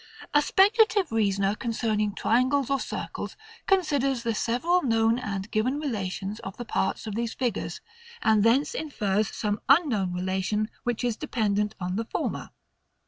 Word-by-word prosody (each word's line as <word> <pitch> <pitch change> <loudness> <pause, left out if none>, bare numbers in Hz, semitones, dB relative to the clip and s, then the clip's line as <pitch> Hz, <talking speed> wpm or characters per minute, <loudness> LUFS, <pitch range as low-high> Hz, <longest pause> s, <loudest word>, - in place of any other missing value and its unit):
A 295 - +6
speculative 410 +1 +4
reasoner 200 -3 +1
concerning 215 -3 -1
triangles 260 +5 +2
or 275 - +2
circles - - -5 0.3
considers 280 -10 +2
the 230 -1 0
several 250 +12 +1
known 225 -2 +2
and 200 -3 -4
given 250 +6 0
relations 205 -6 -3
of 195 - -8
the 240 - -6
parts 195 -1 -1
of 215 - -4
these 230 +1 -2
figures; 250 -3 -2 0.4
and 220 -2 +4
thence 245 +6 +3
infers 215 -9 -1
some 210 -1 -2
unknown 260 - +4
relation, 190 +4 -1
which 245 0 -1
is 240 -2 0
dependent 210 -6 -1
on 180 +1 -2
the 225 - -2
former. - - -3
225 Hz, 145 wpm, -27 LUFS, 205-270 Hz, 0.4 s, A